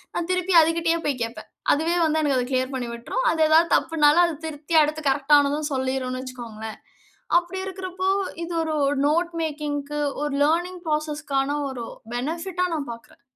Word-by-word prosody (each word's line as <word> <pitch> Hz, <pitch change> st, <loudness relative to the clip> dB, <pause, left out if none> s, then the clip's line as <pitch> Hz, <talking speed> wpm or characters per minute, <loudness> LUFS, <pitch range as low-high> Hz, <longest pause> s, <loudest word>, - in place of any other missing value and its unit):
நான் 345 Hz, +1 st, -2 dB
திருப்பி 365 Hz, 0 st, +1 dB
அதுகிட்டயே 330 Hz, +1 st, +2 dB
போய் 275 Hz, -4 st, -1 dB
கேப்பேன், 230 Hz, +1 st, -7 dB, 0.2 s
அதுவே 325 Hz, +4 st, 0 dB
வந்து 315 Hz, 0 st, +1 dB
எனக்கு 275 Hz, -3 st, +2 dB
அத 250 Hz, -, -1 dB
கிளியர் 260 Hz, +1 st, 0 dB
பண்ணி 245 Hz, -2 st, -3 dB
விட்ரும். 240 Hz, -, -3 dB
அது 320 Hz, -, -1 dB
ஏதாவது 330 Hz, +2 st, +5 dB
தப்புன்னாலும், 320 Hz, +1 st, +4 dB
அதை 335 Hz, -3 st, -2 dB
திருத்தி 310 Hz, +1 st, -4 dB
அடுத்து 305 Hz, +1 st, -1 dB
கரெக்ட் 275 Hz, +2 st, -1 dB
டானதும் 290 Hz, +1 st, +3 dB
சொல்லிருன்னு 260 Hz, -1 st, -2 dB
வச்சிக்கோங்களேன். 225 Hz, -4 st, -8 dB, 0.6 s
அப்படி 350 Hz, +2 st, -7 dB
இருக்கிறப்போ, 375 Hz, 0 st, -3 dB, 0.4 s
இது 345 Hz, -, -6 dB, 0.3 s
ஒரு 280 Hz, +1 st, +1 dB
நோட் 340 Hz, +3 st, +1 dB
மேக்கிங்க்கு 295 Hz, -1 st, -3 dB, 0.2 s
ஒரு 295 Hz, -, -2 dB
லேர்னிங் 350 Hz, +3 st, 0 dB
ப்ராசஸ் 305 Hz, 0 st, -2 dB
க்கான 275 Hz, +1 st, +1 dB
ஒரு 245 Hz, -3 st, -5 dB, 0.3 s
பெனஃபிட் 330 Hz, +8 st, -4 dB
டா -, -, +4 dB
நான் 285 Hz, -5 st, -4 dB
பார்க்குறேன். 230 Hz, 0 st, -13 dB
300 Hz, 165 wpm, -24 LUFS, 270-335 Hz, 0.6 s, ஏதாவது